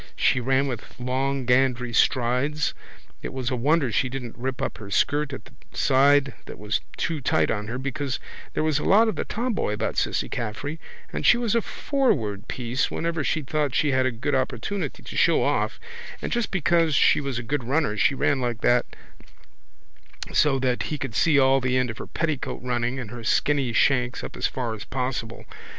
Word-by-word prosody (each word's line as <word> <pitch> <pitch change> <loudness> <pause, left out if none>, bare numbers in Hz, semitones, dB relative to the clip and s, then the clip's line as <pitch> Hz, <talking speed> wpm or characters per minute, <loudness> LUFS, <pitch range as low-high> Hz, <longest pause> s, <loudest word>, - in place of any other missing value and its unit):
She 125 - +2
ran 130 +2 +2
with 125 -4 -6
long 130 +1 -1
gandery 125 -1 +2
strides 130 +5 +1 0.5
it - - -5
was 130 -1 -3
a - - 0
wonder 140 +1 +2
she 125 +4 +1
didn't 125 -3 -6
rip 130 +2 -4
up - - -3
her 105 -3 -9
skirt 145 +7 +1
at 135 - -7
the 125 - -16 0.2
side 140 +1 +4
that - - -8
was 105 +1 -1 0.2
too 160 -4 -2
tight - - +2
on 105 -1 -2
her 120 +3 -4
because 140 0 -3 0.4
there - - +1
was 155 -2 +1
a - - -4
lot 220 +4 +5
of 220 - -1
the - - -3
tomboy 230 - -1
about 110 +1 -2
Cissy - - 0
Caffrey 125 +7 -4 0.3
and - - -3
she 240 - +6
was 235 -3 0
a 230 - +3
forward 115 - -1
piece 125 +2 -1
whenever 165 -2 -2
she 155 +1 0
thought 145 -1 -1
she 150 - +2
had 130 -1 +2
a - - 0
good 120 +5 -3
opportunity 130 - -2
to - - -9
show - - +4
off - - 0 0.4
and - - -4
just 240 -1 0
because 165 -3 +2
she - - +4
was 140 -4 -3
a 120 - -3
good 135 +3 -2
runner 135 -2 0
she 135 +6 +2
ran 135 0 +1
like 120 -3 -2
that 120 0 +3 1.5
so 145 -3 +4
that 130 -2 0
he 150 - -2
could 135 -4 -5
see 150 +5 +3
all 135 0 +4
the 130 0 +1
end 125 -2 +1
of 115 - -11
her - - -6
petticoat 155 -6 -3
running 120 0 -1
and 120 -5 -6
her 120 -1 -8
skinny 140 +2 +1
shanks 125 +1 +2
up - - -7
as - - 0
far 120 -3 -3
as 105 -2 -7
possible. 125 -2 -4
130 Hz, 200 wpm, -25 LUFS, 120-145 Hz, 1.5 s, she